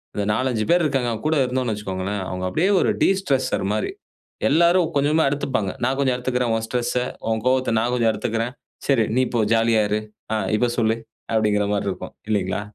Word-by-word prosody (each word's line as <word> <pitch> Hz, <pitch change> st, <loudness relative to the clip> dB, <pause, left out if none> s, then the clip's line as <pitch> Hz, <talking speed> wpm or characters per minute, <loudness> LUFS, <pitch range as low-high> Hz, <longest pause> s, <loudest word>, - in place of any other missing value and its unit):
இந்த 105 Hz, -, -1 dB
4 130 Hz, +4 st, 0 dB
5 110 Hz, -3 st, -1 dB
பேர் 175 Hz, 0 st, +4 dB
இருக்காங்க, 135 Hz, -4 st, 0 dB
அவங்ககூட 155 Hz, +7 st, 0 dB
இருந்தோம்னு 125 Hz, -2 st, -1 dB
வச்சுக்கோங்களேன். 100 Hz, -1 st, -3 dB
அவங்க 90 Hz, 0 st, -4 dB
அப்படியே 175 Hz, -, +1 dB
ஒரு -, -, +2 dB
டிஸ்ட்ரெஸ்செர் 145 Hz, -, +1 dB
மாரி. 105 Hz, -, -1 dB, 0.6 s
எல்லாரும் 170 Hz, +4 st, +4 dB
கொஞ்சம் 145 Hz, +1 st, +2 dB
கொஞ்சமா 160 Hz, -2 st, +3 dB
எடுத்துப்பாங்க. 130 Hz, -8 st, -1 dB
"நான் 130 Hz, +2 st, +1 dB
கொஞ்சம் 130 Hz, -2 st, +2 dB
எடுத்துக்கறேன் 125 Hz, -1 st, -1 dB
உன் 110 Hz, -, -2 dB
ஸ்ட்ரெஸ்ஸ, 125 Hz, +1 st, -1 dB, 0.3 s
உன் 110 Hz, -, 0 dB
கோவத்த 130 Hz, -2 st, +2 dB
நான் 120 Hz, +2 st, 0 dB
கொஞ்சம் 115 Hz, -2 st, +3 dB
எடுத்துக்கறேன். 115 Hz, +3 st, -2 dB, 0.3 s
சரி, 125 Hz, -6 st, +3 dB
நீ -, -, +5 dB
போ 115 Hz, -, +3 dB
ஜாலியா 115 Hz, -1 st, +3 dB
இரு. 105 Hz, +1 st, +1 dB, 0.4 s
ஆ, -, -, +1 dB, 0.2 s
இப்ப 125 Hz, +2 st, +2 dB
சொல்லு." 110 Hz, -1 st, +2 dB, 0.4 s
அப்படிங்கற 105 Hz, -2 st, +2 dB
மாரி 100 Hz, 0 st, -1 dB
இருக்கும். -, -, -8 dB, 0.2 s
இல்லிங்களா? 100 Hz, -1 st, 0 dB
120 Hz, 185 wpm, -22 LUFS, 110-130 Hz, 0.6 s, நீ